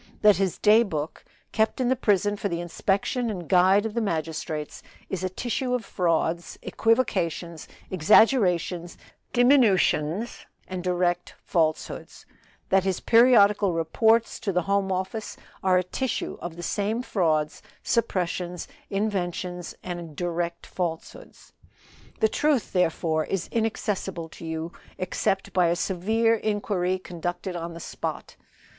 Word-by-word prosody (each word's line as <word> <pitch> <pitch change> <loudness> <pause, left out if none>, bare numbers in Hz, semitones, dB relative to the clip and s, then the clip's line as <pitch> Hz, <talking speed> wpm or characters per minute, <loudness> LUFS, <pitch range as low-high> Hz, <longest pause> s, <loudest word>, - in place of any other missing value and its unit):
That 210 -3 +7
his 190 -2 0
day 215 +2 +6
book, 155 -8 -3 0.3
kept 220 +3 +1
in 255 - +1
the 260 - +3
prison 205 -3 +2
for 200 0 -3
the 170 -1 -2
inspection 195 +7 -1
and 180 -6 -5
guide 190 +3 +4
of 220 - -3
the 235 - 0
magistrates, 160 -4 -3 0.3
is 185 -1 -3
a 185 - 0
tissue 250 +5 -2
of 245 - -4
frauds, 170 -1 -1
equivocations, 180 -8 0 0.2
exaggerations, 180 - +3 0.3
diminutions 230 - +3 0.2
and 185 -1 -5
direct 175 -1 0
falsehoods; 160 -2 -1 0.4
that 190 -1 +4
his 190 -2 -1
periodical 210 -5 +5
reports 220 +8 +2
to 200 - -2
the 180 -1 +1
Home 200 0 0
Office 190 +4 -3 0.2
are 185 -1 +3
a 180 - +2
tissue 255 +8 -3
of 175 -1 -6
the 175 - -8
same 210 +7 -1
frauds, 155 -9 0 0.2
suppressions, 180 -5 -1 0.2
inventions, 180 -3 -2
and 175 -4 -6
direct 170 0 -3
falsehoods. 170 -3 -6 0.7
"The 220 - +6
truth, 290 +1 0
therefore, 165 -3 +1
is 195 -3 -3
inaccessible 205 -6 -2
to 165 - -11
you, 160 +1 -4 0.3
except 190 +1 -1
by 180 -2 +4
a 170 - +2
severe 220 +6 +1
inquiry 205 -4 0
conducted 175 0 -5
on 170 0 -5
the - - -7
spot. - - -5
185 Hz, 130 wpm, -26 LUFS, 170-215 Hz, 0.7 s, That